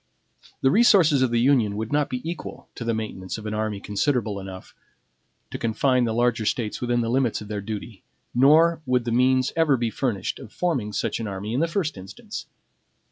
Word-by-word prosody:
The 135 Hz, -, +4 dB
resources 185 Hz, -, +5 dB
of 130 Hz, -, +3 dB
the 120 Hz, 0 st, +1 dB
Union 120 Hz, -5 st, +3 dB
would 110 Hz, +4 st, -4 dB
not 145 Hz, -1 st, +1 dB
be 125 Hz, +3 st, -4 dB
equal 170 Hz, -1 st, -7 dB
to -, -, -7 dB
the 115 Hz, -, 0 dB
maintenance 105 Hz, -4 st, -5 dB
of 110 Hz, -, -9 dB
an 105 Hz, -, -3 dB
army 110 Hz, -1 st, -2 dB
considerable 105 Hz, 0 st, -1 dB
enough 95 Hz, -1 st, -9 dB, 0.8 s
to -, -, -5 dB
confine 125 Hz, +2 st, +2 dB
the 115 Hz, -, -1 dB
larger 120 Hz, -1 st, +1 dB
States 110 Hz, 0 st, -2 dB
within 120 Hz, -1 st, +1 dB
the 115 Hz, -, -1 dB
limits 125 Hz, -2 st, +1 dB
of 105 Hz, -, -10 dB
their 105 Hz, -1 st, -3 dB
duty; 105 Hz, 0 st, -7 dB, 0.3 s
nor 160 Hz, +6 st, +5 dB
would 125 Hz, -2 st, +1 dB
the 120 Hz, -, -1 dB
means 130 Hz, +2 st, +2 dB
ever 160 Hz, -5 st, +3 dB
be 115 Hz, -1 st, -1 dB
furnished 110 Hz, -5 st, -2 dB
of 120 Hz, -5 st, -11 dB
forming 135 Hz, -13 st, -1 dB
such 105 Hz, -, -2 dB
an 115 Hz, -, -3 dB
army 100 Hz, +2 st, -5 dB
in 125 Hz, -, 0 dB
the 165 Hz, -, +2 dB
first 165 Hz, -, -2 dB
instance. 95 Hz, 0 st, -8 dB
120 Hz, 200 wpm, -24 LUFS, 105-135 Hz, 0.8 s, resources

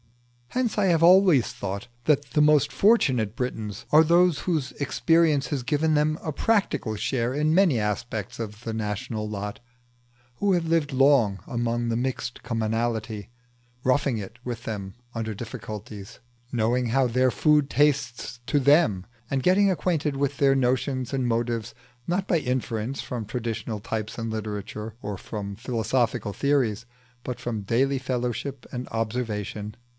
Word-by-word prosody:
Hence 250 Hz, -, -1 dB
I 205 Hz, -, +3 dB
have 165 Hz, -2 st, +3 dB
always 180 Hz, -7 st, +6 dB
thought 100 Hz, +2 st, -5 dB, 0.2 s
that 145 Hz, -4 st, +2 dB
the 150 Hz, -, +3 dB
most 150 Hz, -1 st, +4 dB
fortunate 130 Hz, -, +3 dB
Britons 110 Hz, -5 st, -4 dB
are 155 Hz, +1 st, +8 dB
those 170 Hz, -1 st, +4 dB
whose 155 Hz, -7 st, -1 dB
experience 155 Hz, 0 st, +2 dB
has 140 Hz, -5 st, -2 dB
given 155 Hz, +4 st, +1 dB
them 155 Hz, +1 st, +2 dB
a 155 Hz, -, -3 dB
practical 150 Hz, -, +1 dB
share 120 Hz, +3 st, -1 dB
in 150 Hz, +2 st, +1 dB
many 175 Hz, -, +4 dB
aspects 105 Hz, 0 st, -3 dB
of 110 Hz, 0 st, -6 dB
the 115 Hz, -, -3 dB
national 105 Hz, 0 st, -3 dB
lot, 105 Hz, 0 st, -5 dB, 0.8 s
who 205 Hz, -, +1 dB
have 175 Hz, -2 st, +1 dB
lived 160 Hz, -3 st, +1 dB
long 130 Hz, -7 st, +4 dB
among 120 Hz, -1 st, -1 dB
the 115 Hz, -, 0 dB
mixed 120 Hz, -1 st, -3 dB
commonalty, 115 Hz, -2 st, -2 dB, 0.5 s
roughing 130 Hz, -1 st, +2 dB
it 110 Hz, +3 st, -8 dB
with 120 Hz, -2 st, -5 dB
them 100 Hz, -3 st, -5 dB, 0.2 s
under 110 Hz, -1 st, -3 dB
difficulties, 105 Hz, -1 st, -8 dB, 0.3 s
knowing 120 Hz, +1 st, +1 dB
how 130 Hz, +3 st, +2 dB
their 125 Hz, +2 st, +2 dB
food 150 Hz, +4 st, +3 dB
tastes 135 Hz, -5 st, +1 dB
to 145 Hz, -, +2 dB
them, 140 Hz, -, +4 dB, 0.2 s
and 135 Hz, -2 st, -1 dB
getting 195 Hz, +2 st, +4 dB
acquainted 160 Hz, -6 st, 0 dB
with 140 Hz, 0 st, -1 dB
their 135 Hz, -1 st, +4 dB
notions 130 Hz, 0 st, 0 dB
and 130 Hz, -2 st, 0 dB
motives 115 Hz, -2 st, -1 dB, 0.3 s
not 185 Hz, +3 st, 0 dB
by 170 Hz, -, +3 dB
inference 125 Hz, -2 st, -2 dB
from 120 Hz, -3 st, -4 dB
traditional 115 Hz, -1 st, -4 dB
types 110 Hz, +1 st, -4 dB
in 115 Hz, -1 st, -3 dB
literature 105 Hz, 0 st, -5 dB
or 105 Hz, 0 st, -4 dB
from 100 Hz, 0 st, -6 dB
philosophical 115 Hz, -1 st, -1 dB
theories, 125 Hz, -6 st, +1 dB, 0.4 s
but 125 Hz, -, -5 dB
from 115 Hz, -3 st, -3 dB
daily 130 Hz, +7 st, +1 dB
fellowship 125 Hz, +1 st, -3 dB
and 125 Hz, 0 st, -5 dB
observation. 110 Hz, -2 st, -3 dB
125 Hz, 150 wpm, -25 LUFS, 110-145 Hz, 0.8 s, are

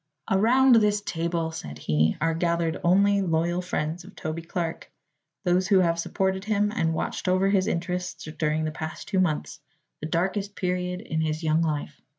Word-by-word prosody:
"Around 240 Hz, +6 st, +5 dB
this 210 Hz, -1 st, +3 dB
table," 165 Hz, -3 st, -2 dB
said 75 Hz, -, -7 dB
he, 75 Hz, +1 st, +1 dB
"are 165 Hz, +1 st, +1 dB
gathered 170 Hz, 0 st, 0 dB
only 200 Hz, +3 st, +4 dB
loyal 175 Hz, 0 st, 0 dB
friends 170 Hz, -1 st, -3 dB
of 195 Hz, +3 st, -14 dB
Toby 155 Hz, +1 st, -4 dB
Clark 165 Hz, 0 st, -4 dB, 0.5 s
those 180 Hz, 0 st, +2 dB
who 200 Hz, -2 st, +5 dB
have 170 Hz, -1 st, +1 dB
supported 190 Hz, +2 st, -1 dB
him 210 Hz, -1 st, +1 dB
and 165 Hz, -7 st, +1 dB
watched 185 Hz, -, -3 dB
over 185 Hz, +1 st, +3 dB
his 195 Hz, -2 st, +2 dB
interests 180 Hz, 0 st, -3 dB
during 155 Hz, 0 st, +1 dB
the 155 Hz, -, -1 dB
past 155 Hz, +1 st, -6 dB
two 190 Hz, -, 0 dB
months, 155 Hz, -5 st, -1 dB, 0.4 s
the 155 Hz, -, -4 dB
darkest 195 Hz, +5 st, -1 dB
period 180 Hz, 0 st, -2 dB
in 160 Hz, -8 st, -2 dB
his 155 Hz, +1 st, -2 dB
young 160 Hz, +1 st, +2 dB
life. 150 Hz, -2 st, -2 dB
175 Hz, 170 wpm, -26 LUFS, 160-190 Hz, 0.5 s, Around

